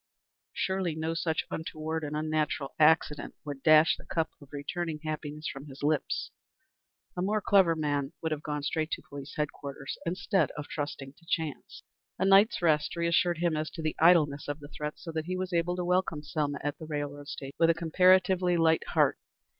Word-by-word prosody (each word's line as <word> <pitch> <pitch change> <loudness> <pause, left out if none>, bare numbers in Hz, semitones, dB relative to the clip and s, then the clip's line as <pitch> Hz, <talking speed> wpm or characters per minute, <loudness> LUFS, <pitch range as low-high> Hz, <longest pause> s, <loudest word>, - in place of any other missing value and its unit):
Surely, 190 -4 -1
no 160 +1 -2
such 165 -1 -1
untoward 160 0 -4
and 150 0 -3
unnatural 155 -2 -1
accident 150 -1 +3
would 145 -2 -6
dash 155 +2 +6
the - - -13
cup 160 -1 -1
of 140 - -14
returning 155 +2 -4
happiness 155 0 -4
from 135 +2 -6
his 135 0 -11
lips. 150 +1 0 0.8
A 180 - -2
more 210 +3 +1
clever 190 -5 +4
man 145 -2 -1
would 160 - -2
have 150 -1 -2
gone 150 -1 -3
straight 155 +2 -1
to - - -4
police 145 0 -9
headquarters, 140 -2 -4
instead 180 +1 +1
of 150 - -5
trusting 145 -2 -5
to 170 +4 -24
chance. 160 -4 -3 0.3
A - - +1
night's 195 +1 +5
rest 150 -2 +2
reassured 170 0 +2
him 170 -1 +1
as 155 0 -2
to 160 - -7
the 155 - -1
idleness 155 -4 +4
of 145 +1 -3
the 145 -1 -11
threat, 150 0 -5
so 165 - -7
that 160 -1 -3
he 185 +1 -2
was 185 0 -3
able 170 +1 +1
to 180 -1 -2
welcome 180 -4 0
Selma 145 -1 -2
at 145 0 -3
the 160 - -8
railroad 145 -1 -4
station 135 0 -7
with 165 - +5
a 165 - +4
comparatively 180 +1 +4
light 165 -1 +4
heart. - - +3
155 Hz, 190 wpm, -29 LUFS, 150-170 Hz, 0.8 s, dash